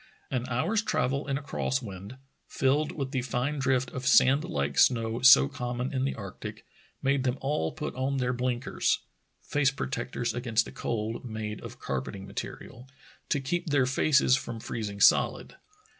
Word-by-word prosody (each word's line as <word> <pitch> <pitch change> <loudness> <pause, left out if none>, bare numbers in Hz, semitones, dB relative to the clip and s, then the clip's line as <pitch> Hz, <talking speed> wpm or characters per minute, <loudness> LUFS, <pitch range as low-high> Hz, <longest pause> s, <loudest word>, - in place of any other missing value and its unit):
An 125 -1 -2
hour's 160 - +1
travel 140 - -1
in 135 -1 0
a 145 - -7
cross 130 -2 -1
wind 100 0 -9 0.2
— - - -47
filled 145 +3 +1
with 135 -3 -4
the 130 - 0
fine 130 +4 -2
drift 130 -1 +1
of 130 0 -4
sand 140 +4 +5
like 70 - -1
snow 115 -1 +3
so 135 +2 +8
common 125 -2 -4
in 130 0 0
the 140 - -2
arctic 100 -4 -8 0.2
— - - -34
made 135 -1 +2
them 130 0 0
all 135 - -1
put - - -5
on 135 +2 -1
their 125 -1 0
blinkers 125 0 0 0.4
(face 145 -2 +2
protectors 125 -3 -3
against 120 -1 +1
the - - -9
cold, 115 0 -3
made 110 -3 -5
of - - -9
carpeting 70 +9 -4
material) 125 +5 -8 0.4
to 145 - +1
keep 170 +7 -2
their 140 -3 +3
faces 135 0 +4
from 120 -3 -5
freezing 105 -3 -5
solid. - - +3
125 Hz, 175 wpm, -28 LUFS, 115-135 Hz, 0.4 s, so